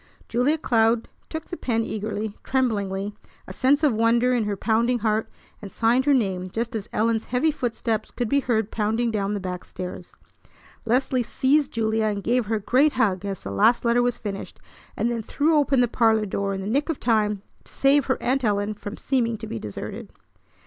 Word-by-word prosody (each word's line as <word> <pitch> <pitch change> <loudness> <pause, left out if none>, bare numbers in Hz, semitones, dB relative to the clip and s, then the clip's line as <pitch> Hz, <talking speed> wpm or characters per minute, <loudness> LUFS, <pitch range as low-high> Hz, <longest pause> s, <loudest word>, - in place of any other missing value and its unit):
Julia 250 +7 +1
Cloud 230 -4 +2 0.2
took 320 0 -6
the - - -4
pen 230 -2 0
eagerly, 215 -1 -4
tremblingly, 205 -6 -1 0.3
a - - -8
sense 280 +4 +2
of 290 -5 +4
wonder 235 +3 +3
in 235 -3 +1
her 205 -1 -2
pounding 235 +4 +2
heart, 220 +1 +1 0.3
and 200 -2 -8
signed 240 +3 +2
her 290 - +4
name 190 -6 -1
just 230 +4 -3
as 215 -1 -4
Ellen's 225 0 +1
heavy 255 +6 +1
footsteps 230 -5 -2
could 245 - -3
be 280 +5 +2
heard 225 -5 0
pounding 225 +2 0
down 205 -1 -1
the - - -2
back 180 -1 -5
stairs. 180 -1 -8 0.7
Leslie 255 +2 +1
seized 275 +4 +1
Julia, 220 -1 +1
and 205 -2 -1
gave 240 0 +1
her 225 - 0
a - - -1
great 265 +8 +3
hug 200 -7 +1
as 195 -2 -4
the 100 - -5
last 230 - +3
letter 235 +1 +3
was 245 0 0
finished, 200 -2 -6 0.4
and 235 - +1
then 230 -1 -2
threw 295 +8 +1
open 280 -3 +3
the 245 - +3
parlor 225 -2 +2
door 200 0 -2
in 190 - -4
the 195 - -5
nick 280 +8 0
of 320 - -2
time 210 -4 +1 0.2
to - - -16
save 275 0 +3
her 260 - +1
Aunt 260 +2 +1
Ellen 205 -1 +1
from 210 0 -8
seeming 235 -4 0
to - - -7
be 115 - -5
deserted. 105 -2 -7
225 Hz, 200 wpm, -24 LUFS, 210-250 Hz, 0.7 s, of